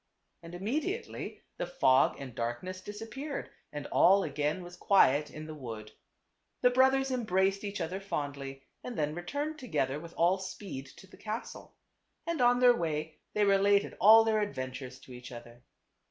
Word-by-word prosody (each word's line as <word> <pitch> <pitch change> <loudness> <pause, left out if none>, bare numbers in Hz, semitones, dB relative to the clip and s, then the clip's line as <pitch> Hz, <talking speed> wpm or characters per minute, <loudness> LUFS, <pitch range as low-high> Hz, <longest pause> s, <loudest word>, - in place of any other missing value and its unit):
And 170 +1 -9
immediately 305 - -3
the - - -3
fog 135 - +3
and 135 -3 -7
darkness 120 +12 -4
disap 210 +3 -8
peared 280 +3 -5 0.2
and 145 -1 -6
all 195 +2 +5
again 150 +5 -1
was 175 0 -10
quiet 150 -6 +4
in 155 0 -8
the 155 - -7
wood. 115 -7 -8 0.7
The 250 - +5
brothers 265 +1 +3
embraced 195 -5 +1
each 205 0 -4
other 185 +4 -3
fondly, 140 -7 -5 0.2
and 245 -2 -6
then 150 -1 0
returned 285 - -4
together 140 - -1
with 170 +1 -11
all 175 +3 +3
speed 185 -7 -7
to 190 - -15
the 190 - -17
castle. 220 +2 -6 0.5
And 335 -4 -1
on 245 0 +5
their 245 -1 +7
way 155 -3 -3 0.2
they 210 -1 +3
related 200 0 +3
all 220 +3 +9
their 220 -1 +2
adventures 130 -7 -5
to 130 - -12
each 125 +2 -10
other. 120 0 -11
185 Hz, 165 wpm, -31 LUFS, 145-220 Hz, 0.7 s, all